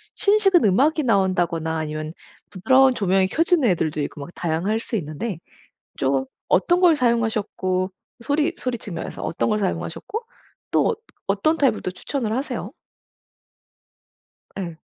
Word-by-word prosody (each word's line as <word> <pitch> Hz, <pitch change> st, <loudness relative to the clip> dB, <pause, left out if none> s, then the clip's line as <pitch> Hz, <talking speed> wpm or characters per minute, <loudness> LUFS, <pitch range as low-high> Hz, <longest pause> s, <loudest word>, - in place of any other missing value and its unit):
신식은 400 Hz, -4 st, +4 dB
음악이 280 Hz, -, +3 dB
나온다거나 175 Hz, -, +1 dB
아니면 155 Hz, 0 st, -4 dB, 0.4 s
부드러운 260 Hz, +7 st, +4 dB
조명이 190 Hz, -2 st, +2 dB
켜지는 325 Hz, -, +2 dB
애들도 155 Hz, -3 st, -1 dB
있고 145 Hz, -, -6 dB
뭐 140 Hz, -, -7 dB
다양할 175 Hz, +6 st, -1 dB
수 230 Hz, -, -4 dB
있는데 165 Hz, +2 st, -4 dB, 0.6 s
좀 135 Hz, 0 st, 0 dB, 0.2 s
어떤 350 Hz, -, +3 dB
걸 355 Hz, -3 st, +6 dB
사용하셨고 220 Hz, -7 st, 0 dB, 0.3 s
소리 305 Hz, +4 st, +1 dB
소리 250 Hz, -2 st, -3 dB
측면에서 175 Hz, -6 st, -6 dB
어떤 -, -, -1 dB
걸 215 Hz, -1 st, +1 dB
사용하셨고 210 Hz, -, -3 dB, 0.5 s
또 -, -, +3 dB
어뜨 -, -, -4 dB, 0.3 s
어떤 200 Hz, +12 st, +2 dB
타입을 260 Hz, -6 st, +2 dB
또 -, -, -2 dB
추천을 220 Hz, +5 st, -3 dB
하세요? 275 Hz, -, -3 dB, 1.9 s
예. 170 Hz, -4 st, -5 dB
205 Hz, 315 characters per minute, -23 LUFS, 175-270 Hz, 1.9 s, 걸